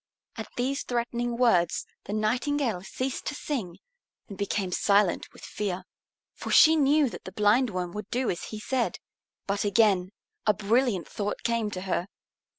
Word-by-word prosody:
At - - -6
these 265 +3 0
threatening 240 0 -2
words 185 -9 +3 0.2
the 205 - -5
Nightingale 235 0 0
ceased 255 +7 -4
to - - -2
sing 220 - -4 0.5
and 200 - -8
became 200 -1 -2
silent 200 0 +2
with - - -16
fear. 190 -3 -3 0.5
For - - -7
she 320 +1 +7
knew 295 0 +4
that - - -8
the 185 - -7
Blindworm 205 -3 +2
would 210 0 -6
do 250 0 0
as 175 - -5
he 215 - -7
said. 255 +2 -1 0.5
But 200 +1 -1
again 200 -3 +3 0.4
a 210 - +5
brilliant 215 - +1
thought 205 0 -4
came 230 -2 0
to 185 -3 -5
her. 185 -1 -1
215 Hz, 155 wpm, -27 LUFS, 195-245 Hz, 0.5 s, she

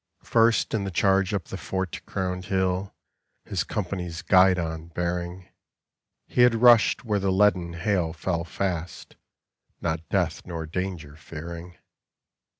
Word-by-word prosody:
First 115 0 +3
in 110 -3 0
the 100 - -3
charge 95 +2 +2
up 100 -4 -1
the 95 - -7
fort 95 0 -4
crowned 90 -1 -3
hill, 95 0 -1 0.5
His - - -1
company's 90 -4 -4
guidon 90 -4 +3
bearing, 90 +1 -3 0.8
He 125 - +1
had 120 -1 +6
rushed 115 -1 +5
where 105 -3 +1
the 95 0 0
leaden 95 -3 +2
hail 85 -1 0
fell 85 0 -2
fast, 90 0 -4 0.6
Not 80 -1 -3
death - - 0
nor 85 -2 -5
danger 85 -3 -4
fearing. 85 +2 -9
90 Hz, 130 wpm, -26 LUFS, 85-95 Hz, 0.8 s, had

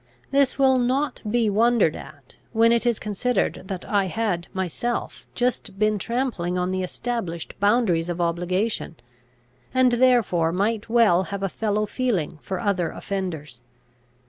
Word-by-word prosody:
This 275 -1 +2
will 265 -2 +4
not 260 +3 0
be 230 0 +2
wondered 215 -4 +3
at, 145 -3 -12 0.2
when 230 +1 +5
it 235 +1 +2
is 235 -3 +2
considered 215 +4 -1
that 190 -2 -5
I 200 -2 +1
had 185 -3 -2
myself 190 +6 -3
just 240 -5 -1
been 215 0 +2
trampling 225 -7 -2
on 180 +1 0
the 185 0 -1
established 185 -3 -4
boundaries 200 -5 +2
of 175 0 -3
obligation, 175 +3 -1 0.8
and 255 -1 +5
therefore 235 -10 +3
might 210 +5 -1
well 215 -6 +4
have 200 +3 -5
a 195 - 0
fellow 215 +1 -1
feeling 205 - -2
for 190 -2 -4
other 185 -5 0
offenders. 160 -12 -5
205 Hz, 145 wpm, -24 LUFS, 180-240 Hz, 0.8 s, when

